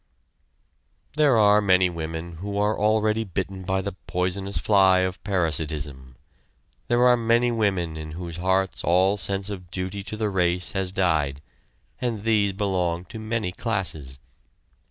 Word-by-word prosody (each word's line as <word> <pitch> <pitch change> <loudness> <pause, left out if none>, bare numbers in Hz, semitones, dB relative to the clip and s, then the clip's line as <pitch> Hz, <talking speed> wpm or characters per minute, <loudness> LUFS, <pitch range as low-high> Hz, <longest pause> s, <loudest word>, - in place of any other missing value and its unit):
There 145 -5 +4
are 105 -1 +5
many 95 -2 +4
women 80 0 -6
who 100 +3 -5
are 105 +1 +2
already 110 +1 +2
bitten 95 -1 -4
by 95 +1 -1
the 100 - -3 0.2
poisonous 95 +2 -2
fly 95 -3 +4
of 95 0 -3
parasitism; 75 -8 -2 0.7
there 120 +1 +3
are 125 0 +6
many 120 +1 +2
women 95 -8 0
in 80 0 -7
whose 85 -1 -6
hearts 95 +1 0
all 95 +3 +3
sense 100 0 -2
of 90 -3 -8
duty 95 +3 -4
to 110 +2 -6
the 105 -1 -1
race 90 -1 0
has 95 -2 -1
died, 80 -7 +1 0.6
and 115 -5 -2
these 105 -3 +2
belong 90 -4 -1
to 110 - -6
many 110 -4 -2
classes. 90 - -3
95 Hz, 145 wpm, -24 LUFS, 90-105 Hz, 0.7 s, are